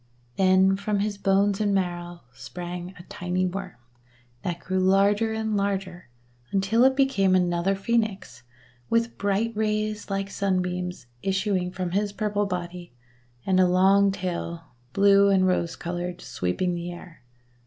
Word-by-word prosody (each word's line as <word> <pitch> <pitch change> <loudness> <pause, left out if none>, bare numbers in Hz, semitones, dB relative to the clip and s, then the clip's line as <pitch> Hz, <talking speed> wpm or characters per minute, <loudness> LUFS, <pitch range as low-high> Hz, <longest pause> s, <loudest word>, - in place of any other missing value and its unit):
Then 190 0 +4
from 200 0 -1
his 205 -1 -2
bones 195 +1 +2
and 205 -1 +2
marrow 175 -2 -3
sprang 175 +5 -7
a 175 - -11
tiny 180 +1 -2
Worm, 185 0 -5 0.7
that 175 -2 -3
grew 185 +2 -2
larger 200 +4 +3
and 220 -1 -2
larger 195 -5 -2 0.4
until 200 +5 +2
it 265 0 +4
became 235 -9 +3
another 180 +1 +1
Phoenix, 195 - -2 0.5
with 230 0 0
bright 205 +3 0
rays 215 0 -1
like 195 0 -2
sunbeams 180 -4 -2 0.2
issuing 195 -2 0
from 180 -1 -4
his 200 +2 0
purple 205 0 -1
body, 175 -3 -5 0.5
and 190 -1 +2
a 185 - +5
long 195 +2 +4
tail, 175 -3 -4 0.3
blue 200 0 +5
and 190 -1 +4
rose 170 -2 0
coloured, 175 +1 -4
sweeping 175 - -2
the 175 0 -4
air. 175 -2 -12
190 Hz, 140 wpm, -25 LUFS, 180-200 Hz, 0.7 s, a